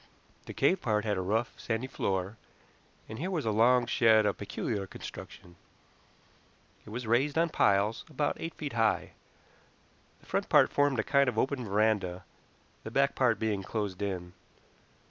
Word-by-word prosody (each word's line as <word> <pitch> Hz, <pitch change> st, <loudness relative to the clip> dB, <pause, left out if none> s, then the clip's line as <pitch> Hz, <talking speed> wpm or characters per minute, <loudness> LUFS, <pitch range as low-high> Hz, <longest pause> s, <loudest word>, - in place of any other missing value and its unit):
The -, -, -6 dB
cave 190 Hz, -, +2 dB
part 105 Hz, -1 st, 0 dB
had 105 Hz, -2 st, 0 dB
a 95 Hz, -, -2 dB
rough, 110 Hz, +6 st, -1 dB
sandy 110 Hz, +2 st, -2 dB
floor, 95 Hz, -5 st, -2 dB, 0.7 s
and 110 Hz, +1 st, -8 dB
here 175 Hz, +5 st, -2 dB
was 170 Hz, -8 st, -2 dB
a 110 Hz, -, +1 dB
long 120 Hz, +3 st, +4 dB
shed 110 Hz, -2 st, +4 dB
of 105 Hz, -, -1 dB
peculiar 100 Hz, 0 st, -3 dB
construction. 85 Hz, -1 st, -10 dB, 1.3 s
It -, -, -9 dB
was 120 Hz, +3 st, -5 dB
raised 130 Hz, +7 st, +1 dB
on 170 Hz, +1 st, +3 dB
piles, 100 Hz, -5 st, +2 dB
about 145 Hz, -1 st, -1 dB
eight 165 Hz, -, -5 dB
feet 145 Hz, -4 st, -5 dB
high; 115 Hz, -2 st, +1 dB, 1.1 s
the -, -, -23 dB
front -, -, -2 dB
part -, -, +5 dB
formed 145 Hz, -2 st, +2 dB
a 110 Hz, -, +1 dB
kind 140 Hz, -1 st, +3 dB
of 115 Hz, -, -6 dB
open 130 Hz, +1 st, 0 dB
veranda, 100 Hz, -3 st, 0 dB, 0.6 s
the -, -, -6 dB
back 140 Hz, +4 st, +2 dB
part 125 Hz, -5 st, +2 dB
being 105 Hz, -2 st, -1 dB
closed 100 Hz, -1 st, -4 dB
in. 90 Hz, -3 st, -4 dB
110 Hz, 165 wpm, -30 LUFS, 100-130 Hz, 1.3 s, part